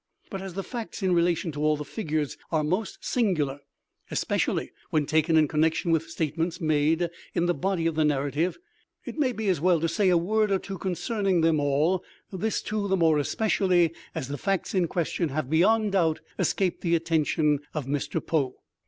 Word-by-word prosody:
But 195 - -4
as 190 -2 -7
the 195 - -3
facts 230 -2 -6
in 185 -1 +3
relation 170 -1 +1
to 145 0 -4
all 155 0 +3
the 150 - -6
figures 155 -5 -2 0.2
are 155 -2 +2
most 185 +8 -2
singular 155 - 0 0.5
(especially - - -1 0.2
when 155 -2 +1
taken 160 +2 +2
in 155 -1 +5
connection 160 +3 +1
with 165 0 +1
statements 165 +2 -2
made 155 +1 +2 0.3
in 170 - +2
the 175 - +2
body 185 -2 -1
of 165 - +1
the 155 0 +1
narrative), 145 +3 0 0.5
it - - -6
may 265 -4 +2
be 220 -3 -4
as 180 -6 +1
well 175 -1 +4
to 165 - 0
say 185 +4 +2
a 180 - +5
word 215 +5 +1
or 195 - +3
two 195 -1 -7
concerning 195 0 0
them 160 -1 +3
all—this, 180 +8 -1
too, 210 -1 -2
the 190 0 +2
more 160 -3 +4
especially 180 -1 +2 0.2
as 130 - -3
the 140 +1 -5
facts 195 -2 -1
in 185 -3 +2
question 170 -1 -1
have, 140 -1 -3
beyond 210 +6 +3
doubt, 165 -5 +2 0.2
escaped 185 -3 0
the 170 -1 +2
attention 160 -2 +1 0.2
of 150 -4 -2
Mr. 140 +1 -2
Poe. 140 -6 0
170 Hz, 190 wpm, -26 LUFS, 155-190 Hz, 0.5 s, in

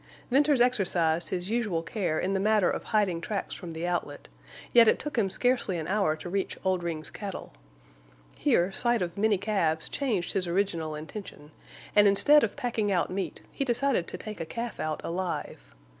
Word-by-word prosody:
Venters 285 +1 +4
exercised 175 -9 +2
his 180 +2 -3
usual 210 -8 0
care 170 -3 -2
in 190 - -1
the 195 - +1
matter 210 -2 +3
of - - -4
hiding 195 -6 +1
tracks 200 +3 -3
from 170 -3 -7
the 165 +2 -4
outlet, 170 - -3 0.4
yet 235 -1 +8
it - - +5
took 300 - -5
him 215 -5 +2
scarcely 245 -3 +1
an 160 - -4
hour 195 -6 +1
to 155 - -9
reach 195 +2 -2
Oldring's 170 -4 -1
cattle. 200 - -7 0.8
Here 175 - +2
sight 240 0 +2
of 170 -1 -5
many 210 0 +2
calves 165 -6 0
changed 220 -11 -1
his 185 -2 0
original 170 -4 -1
intention, 155 -1 -9 0.4
and 205 0 +7
instead 290 +9 +6
of 220 - -1
packing 225 -4 -1
out 180 -2 +1
meat 190 +1 -4
he - - -2
decided 245 -6 +1
to - - -6
take 215 +3 -8
a - - -2
calf 230 +6 -5
out 155 -1 -2
alive. 180 - -4
195 Hz, 180 wpm, -28 LUFS, 170-220 Hz, 0.8 s, yet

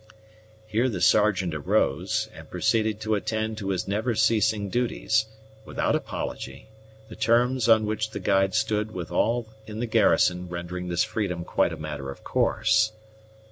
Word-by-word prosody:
Here 110 +4 +1
the 100 -6 -3
Sergeant 95 -4 +3
arose, 75 -2 0
and - - -12
proceeded 110 -2 +1
to 110 0 -1
attend 110 +1 -2
to 100 -2 -4
his 95 -2 -1
never 110 +4 -1
ceasing 110 -1 +2
duties, 110 -1 0 0.4
without - - -1
apology; 70 +10 -5 0.4
the - - -10
terms 120 +1 +2
on 110 -1 +6
which 110 +1 -2
the - - -6
guide 95 -1 +2
stood 105 0 0
with 90 -2 -5
all 115 +5 +1 0.2
in 110 0 -7
the 120 - -1
garrison 90 -5 +2
rendering 90 +1 -5
this 85 -1 +1
freedom 90 -6 -3
quite - - +1
a - - -6
matter 75 -3 -6
of 70 - -9
course. 110 0 +2
110 Hz, 155 wpm, -26 LUFS, 90-110 Hz, 0.4 s, on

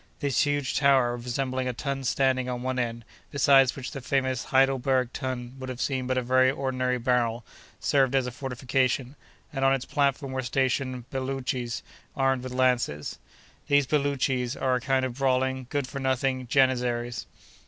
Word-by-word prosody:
This 140 -1 +1
huge 145 -2 -1
tower, 135 -4 +4
resembling 130 +2 -2
a 125 - -1
tun 135 +2 -3
standing 130 -1 +1
on 125 -1 -3
one 130 0 -1
end, 115 -1 -3 0.2
beside 135 -1 +5
which 130 -2 -6
the 135 - -6
famous 130 -1 0
Heidelberg 130 -1 +2
tun 125 -1 -4
would 130 0 -6
have 125 -1 -6
seemed 130 -1 -1
but 130 0 0
a 130 - +1
very 130 +1 +4
ordinary 130 -2 -1
barrel, 120 -2 0 0.3
served 135 -2 +2
as 130 -2 +2
a 125 - -4
fortification, 130 +1 -1 0.4
and 135 -1 -2
on 135 0 +5
its 130 -1 -5
platform 140 -1 0
were 130 0 -2
stationed 130 -1 -1
Belootchees, 130 -2 -3 0.3
armed 135 -1 +2
with 130 - -6
lances. 125 - 0 0.5
These 145 -1 +4
Belootchees 135 -3 0
are 130 -1 +1
a 125 - 0
kind 135 0 +1
of 130 0 -6
brawling, 130 -1 +1
good 145 -2 -1
for 140 +2 -6
nothing 130 -1 0
Janizaries. 120 -2 +1
130 Hz, 165 wpm, -27 LUFS, 125-135 Hz, 0.5 s, beside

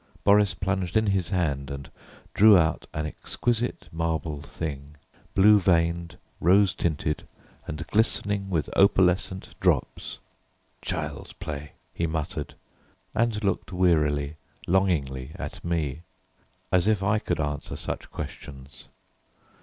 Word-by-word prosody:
Boris 100 -2 +5
plunged 95 +1 -1
in 110 - +3
his 95 -4 +1
hand 75 -8 -1
and 70 -1 -7 0.4
drew 105 -1 +8
out 80 -2 +1
an 75 0 -3
exquisite 120 +9 -2
marble 80 -2 -2
thing, 75 -1 -6 0.4
blue 105 +2 +7
veined, 85 -2 +1 0.2
rose 95 +3 +5
tinted, 75 -2 -2 0.4
and 75 +2 -5
glistening 105 -2 +1
with 80 -5 0
opalescent 95 -1 +3
drops. - - 0 0.6
"Child's - - -4
play," 75 -1 -6 0.2
he 85 - -1
muttered, 80 -2 -3 0.6
and 115 -2 +1
looked 100 -1 -1
wearily, 75 -5 +2 0.3
longingly 75 -8 0
at - - -7
me, 80 -4 -1 0.7
as 90 +1 +3
if 105 -3 +2
I 105 +2 +2
could 80 - -2
answer 75 -2 -3
such - - -5
questions! 70 -3 -8
85 Hz, 115 wpm, -26 LUFS, 75-95 Hz, 0.7 s, drew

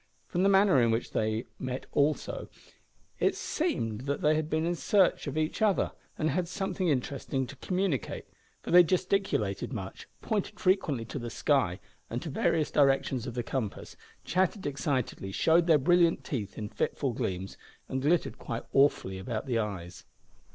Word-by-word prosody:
From 175 - -2
the 195 - +4
manner 195 -8 +5
in 115 - +3
which 115 +1 -1
they 110 +1 -1
met 130 0 -4
also, 145 +1 0 0.7
it - - +2
seemed 130 - -2
that 140 - -1
they 150 0 +4
had 155 0 -1
been 160 +1 0
in 175 - +1
search 190 -1 +2
of 140 +2 -3
each 155 +6 -1
other, 210 -3 +2 0.3
and 155 0 +1
had 180 -1 0
something 190 0 -2
interesting 135 -1 -1
to 140 +4 -10
communicate, 180 -3 -2 0.4
for - - -5
they 180 +1 +9
gesticulated 180 - 0
much, 100 -6 -6
pointed 210 -1 -2
frequently 170 - +1
to 135 - -5
the 120 -1 -5
sky, 115 - +1 0.3
and - - -2
to - - -5
various 155 -2 +1
directions 135 -3 +2
of 120 - -5
the 120 - -1
compass, 115 -6 -4 0.3
chattered 185 +2 0
excitedly, 135 -8 -2
showed 165 - +3
their 160 -3 +6
brilliant 170 +4 +3
teeth 105 -8 -4
in 105 - -4
fitful 130 +4 -2
gleams, 95 -3 -3 0.3
and 130 - -2
glittered 160 +5 +1
quite 115 0 -4
awfully 135 -9 +3
about 110 +4 -4
the 120 -4 0
eyes. 95 -5 -5
140 Hz, 165 wpm, -29 LUFS, 115-175 Hz, 0.7 s, they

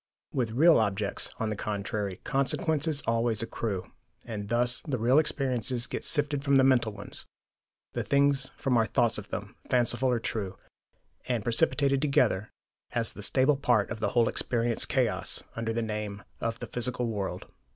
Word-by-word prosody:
With 125 -4 0
'real' 160 +5 +6
objects, 100 -1 -1
on 110 -3 -2
the - - -2
contrary, 100 -2 -3
consequences 145 +2 0
always 115 -1 +1
accrue; 105 -5 -4 0.3
and 105 -3 -5
thus 120 +1 +1
the 135 -4 0
real 125 +6 +4
experiences 130 -5 0
get - - -5
sifted 145 -2 +2
from 140 -1 +3
the 135 - +6
mental 125 -4 +3
ones, 105 -1 -7 0.7
the - - -1
things 140 -1 +2
from 130 -4 +1
our 110 -1 +3
thoughts 115 -1 +2
of - - -10
them, - - -6
fanciful 125 +1 +2
or 120 -2 +1
true, 100 -4 -4 0.7
and 120 -4 0
precipitated 140 +3 +2
together 125 -8 +2 0.4
as 115 -2 0
the - - -9
stable 135 +6 +3
part 120 -7 +2
of 115 - -4
the 105 -2 0
whole 115 -2 +5
experience 120 -1 0
chaos, 125 -3 0
under 115 0 -2
the 115 +1 -1
name 105 -2 -4 0.2
of 115 0 -2
the - - -6
physical 125 0 -2
world." 105 -4 -3
120 Hz, 165 wpm, -28 LUFS, 110-135 Hz, 0.7 s, real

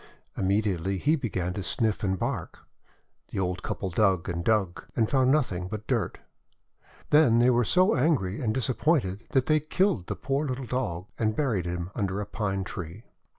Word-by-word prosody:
Immediately 95 -1 0
he 150 - +2
began 95 - -2
to 100 - -4
sniff 110 +2 -1
and 95 -1 +1
bark. - - -4 0.6
The - - -7
old 90 -1 -1
couple 95 - -3
dug 95 -2 +2
and 85 -1 -2
dug, 100 -5 +1
and 115 -2 +2
found 130 0 +3
nothing 95 -12 +1
but 105 +2 -6
dirt. - - -1 0.9
Then 150 -6 +6
they 120 +2 +5
were 120 0 +3
so 185 - +3
angry 125 - +1
and 115 -4 +1
disappointed 120 - 0
that 130 -2 +3
they 155 0 +3
killed 155 - 0
the - - -3
poor 140 +2 -1
little 130 0 -3
Dog, 105 -9 -2
and 110 -1 +1
buried 115 - 0
him 85 +1 -4
under 100 -2 -2
a 105 - -3
Pine 100 -2 -2
Tree. 90 +3 -7
110 Hz, 175 wpm, -27 LUFS, 95-130 Hz, 0.9 s, Then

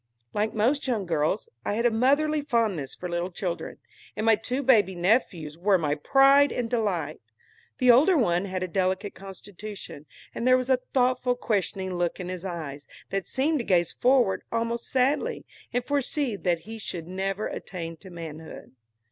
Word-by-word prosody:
Like 215 +2 -1
most 255 +7 +1
young 225 -6 0
girls, 160 +4 0 0.2
I 205 - -1
had 235 +2 0
a 240 - +5
motherly 285 +6 +2
fondness 220 - -1
for 180 - -6
little 175 +1 -2
children, 175 -1 -4 0.4
and 215 - -2
my 225 -1 +6
two 250 +6 -3
baby 210 -8 +4
nephews 175 - 0
were 195 +1 +4
my 150 -4 0
pride 275 - +5
and 245 - -2
delight. 195 -10 -1 0.6
The 250 -1 +6
older 310 +9 +5
one 180 -7 +2
had 185 -1 -3
a - - -2
delicate 185 +3 -1
constitution, 195 -4 -9 0.3
and 235 - -2
there 255 0 +6
was 255 +1 -1
a 260 - +5
thoughtful, 250 -1 +2
questioning 195 -5 -2
look 175 0 -1
in 180 -1 -5
his 185 -1 -5
eyes, 155 -6 -6 0.2
that 195 -1 -2
seemed 290 +4 +1
to - - -2
gaze 175 -5 +2
forward 245 -6 +2
almost 230 0 -1
sadly, 280 - +1 0.3
and 245 0 -1
foresee 285 -3 0
that 175 -4 0
he 225 +5 -9
should 170 -5 -6
never 195 +3 -2
attain 165 -3 -6
to 190 - -13
manhood. 160 -2 -9
205 Hz, 175 wpm, -26 LUFS, 175-250 Hz, 0.6 s, my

